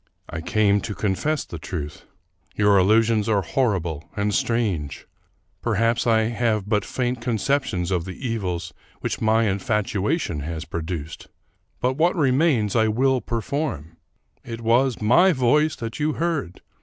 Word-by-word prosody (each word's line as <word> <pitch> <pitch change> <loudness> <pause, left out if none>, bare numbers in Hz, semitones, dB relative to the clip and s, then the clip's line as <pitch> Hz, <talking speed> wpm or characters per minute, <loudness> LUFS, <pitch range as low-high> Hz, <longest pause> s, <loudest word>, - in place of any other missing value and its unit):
" - - -36
I 85 -1 -4
came 105 +1 +2
to 105 +1 -5
confess 130 +10 -1
the 85 - -8
truth. 75 -3 -6 0.5
Your 105 -1 +4
allusions 110 +2 +3
are 100 -3 +2
hor 110 +2 +1
rible 80 -2 -6
and 105 0 0
strange. 100 - -1 0.6
Perhaps 115 +1 +1
I 110 -1 +4
have 110 -2 0
but 105 -2 +1
faint 125 -1 -2
conceptions 115 -6 -1
of 90 -3 0
the 95 +8 -6
evils 90 -7 -3 0.3
which - - -3
my 110 +1 +3
infatuation 105 - -1
has 80 +3 -5
produced; 80 -2 -5 0.5
but 130 +1 0
what 170 +4 +3
remains 130 - +2
I 110 -1 +4
will 130 +4 +2
perform. 115 - -3 0.5
It 115 -1 -7
was 120 +2 +2
my 175 - +5
voice 150 +4 +2
that 115 +3 -6
you 150 +1 +1
heard 160 - -2
110 Hz, 145 wpm, -23 LUFS, 95-125 Hz, 0.6 s, my